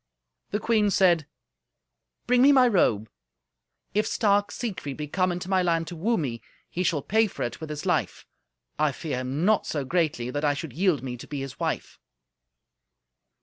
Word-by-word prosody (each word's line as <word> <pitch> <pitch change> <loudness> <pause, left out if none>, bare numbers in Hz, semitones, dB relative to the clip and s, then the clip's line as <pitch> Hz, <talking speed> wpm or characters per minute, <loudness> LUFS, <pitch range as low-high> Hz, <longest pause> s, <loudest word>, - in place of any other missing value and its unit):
The 210 - -1
queen 215 -2 +2
said, 175 -6 +3 1.0
"Bring 245 0 +3
me 280 +2 +7
my 260 -3 +6
robe. 115 - +2 0.9
If 215 +1 +1
stark 205 -2 +2
Siegfried 185 - -5
be 150 -1 -4
come 185 +4 +1
into 175 0 -4
my 190 -1 +2
land 165 -2 +1
to 175 - -7
woo 220 +9 +1
me, 125 -7 -3 0.3
he 180 - -2
shall 160 -5 0
pay 220 +1 +3
for - - -5
it 120 +5 -5
with 160 - -6
his 150 -1 -5
life. - - -1 0.5
I 150 -2 +2
fear 150 -2 -4
him 135 +6 -2
not 215 +1 +3
so 145 -3 -2
greatly 145 -6 0
that 145 +3 -3
I 145 -1 +2
should 145 -3 -6
yield 170 -2 +1
me 125 -2 -5
to - - -11
be 145 -2 -4
his 135 0 -7
wife." - - -3
165 Hz, 185 wpm, -26 LUFS, 145-200 Hz, 1.0 s, me